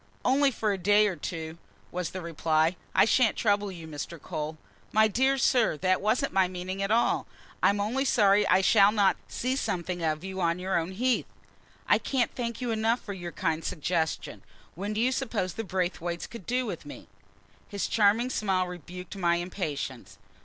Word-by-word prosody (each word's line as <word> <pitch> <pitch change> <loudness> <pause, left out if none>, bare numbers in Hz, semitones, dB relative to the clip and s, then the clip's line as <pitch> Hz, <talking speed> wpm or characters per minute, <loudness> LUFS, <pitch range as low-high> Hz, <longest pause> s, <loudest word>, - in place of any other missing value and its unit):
"Only 275 +2 +4
for 220 -4 -1
a 195 - -4
day 205 +3 +4
or 190 - -2
two," 160 0 -6 0.3
was 180 -2 -3
the 185 - -6
reply. 160 0 +1 0.2
"I - - +6
shan't 225 0 +3
trouble 205 -2 +1
you, 165 -3 -9
Mr. 155 +2 -6
Cole." 155 +2 -5 0.3
"My 220 0 +5
dear 265 +5 +2
sir, 245 - +3
that 185 +3 +1
wasn't 220 +6 +1
my 190 -1 +4
meaning 185 +1 -5
at 195 - -1
all. 230 +2 +2 0.3
I'm 200 +1 +3
only 230 +7 0
sorry 205 -5 +4
I 190 - +4
shall 200 +1 +6
not 205 -3 +3
see 255 +2 -2
something 180 -8 -2
of 155 0 -1
you 190 0 -5
on 170 0 +1
your 185 +1 -2
own 170 +3 -1
heath. 250 +5 +1 0.6
I - - +4
can't 255 -4 0
thank 235 -1 -4
you 245 -2 -1
enough 225 +2 +1
for 205 - -6
your 175 -2 -6
kind 160 -1 -1
suggestion. 165 -1 -2 0.3
When 200 +5 -4
do 215 - -2
you 250 +3 +3
suppose 225 -9 -2
the 225 - -4
Braithwaites 175 -3 -2
could 230 -6 -11
do 250 +1 0
with - - -5
me?" - - -11 0.6
His 200 -2 -2
charming 225 +4 +3
smile 190 -5 +1
rebuked 180 +1 -8
my 170 -2 +2
impatience. 160 - -4
195 Hz, 185 wpm, -28 LUFS, 175-225 Hz, 0.6 s, I